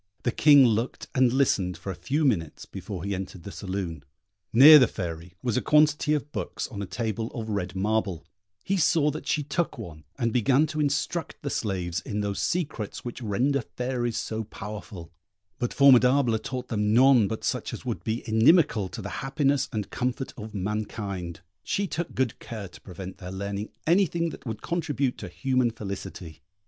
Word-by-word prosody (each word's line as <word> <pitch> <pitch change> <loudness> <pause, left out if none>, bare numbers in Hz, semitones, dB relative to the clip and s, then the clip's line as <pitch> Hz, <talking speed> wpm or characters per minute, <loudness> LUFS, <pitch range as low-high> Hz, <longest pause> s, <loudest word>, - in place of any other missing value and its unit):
The 120 - +1
King 145 0 +7
looked 115 +1 0
and 130 -2 +4
listened 105 -9 +1
for 95 - -5
a - - -6
few 150 - -1
minutes 85 - 0
before 95 -5 -7
he 100 +1 -2
entered 95 -2 -6
the 100 - -7
saloon. 95 -7 -5 0.5
Near 150 +6 +10
the 125 - +5
Fairy 85 -2 -6
was 120 -4 0
a - - +2
quantity 150 0 +3
of 145 0 -4
books - - -4
on 105 -5 -6
a 100 - -4
table 110 +1 -3
of 110 -2 -4
red 95 -3 -3
marble: 100 -4 -1 0.4
he 195 - 0
saw 150 -2 +3
that 155 - -7
she 150 - +1
took 155 +4 -2
one 85 -9 -9
and 115 -1 0
began 130 +5 +3
to 155 0 -5
instruct 150 +4 -1
the 140 - -2
slaves 90 -7 -2
in 105 0 -3
those 100 -1 -2
secrets 150 - -2
which 120 +1 -6
render 125 +6 +1
fairies 120 0 -3
so 110 0 -3
powerful; 100 -5 -8 0.5
but 120 -2 -1
Formidable 130 -3 +5
taught 125 +3 -5
them 105 -1 +1
none 125 -4 +6
but 110 +2 -5
such - - -2
as - - -8
would - - -3
be 110 +2 -3
inimical 110 - +4
to 115 +1 -7
the - - -4
happiness 135 0 +1
and 105 -5 -4
comfort 125 +2 -2
of 110 -1 -8
mankind; 100 -3 -4 0.2
she 200 - -1
took 170 -2 -4
good 130 -4 -1
care 110 -4 -7
to 90 - -15
prevent 95 0 -9
their 90 - -7
learning 100 +2 -4 0.2
anything 170 -1 +2
that - - -11
would 110 -1 -5
contribute 145 -6 -1
to 100 - -6
human 130 +6 +1
felicity. 95 -6 -7
115 Hz, 180 wpm, -26 LUFS, 100-140 Hz, 0.5 s, Near